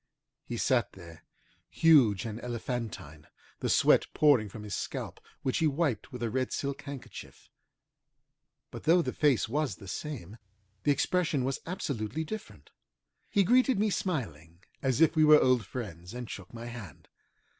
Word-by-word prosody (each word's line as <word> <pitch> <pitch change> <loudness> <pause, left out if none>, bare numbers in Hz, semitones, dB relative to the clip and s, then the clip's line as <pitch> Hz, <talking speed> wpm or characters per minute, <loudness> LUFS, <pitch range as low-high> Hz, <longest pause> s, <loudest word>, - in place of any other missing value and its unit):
He 120 - -4
sat 120 0 +1
there, 85 -3 -13 0.5
huge 130 - +4
and 115 0 -5
elephantine, 115 - -5 0.3
the - - -2
sweat - - +4
pouring 135 -9 +4
from 105 +2 -9
his 105 -1 -6
scalp, - - -4 0.2
which 130 - 0
he 160 - +3
wiped 140 -7 -1
with 125 -2 -6
a 115 - 0
red 130 +1 -1
silk 140 0 -3
handkerchief. 140 -2 -10 1.2
But - - -9
though 170 +2 +5
the - - -3
face 145 -6 +2
was 145 +3 -1
the 100 - -13
same, 115 - -6 0.5
the 145 - +5
expression 155 -1 +1
was 135 +1 -2
absolutely 140 - -3
different. 215 +7 -8 0.6
He 200 - +3
greeted 255 +4 +4
me 210 +1 +1
smiling, 85 - -4 0.2
as 130 -1 0
if 165 - +5
we 155 - +5
were 150 0 +8
old 125 -6 +2
friends, 95 -5 -7
and 125 -1 -5
shook 100 -3 -9
my 115 0 -8
hand. 115 - -9
125 Hz, 155 wpm, -30 LUFS, 110-150 Hz, 1.2 s, were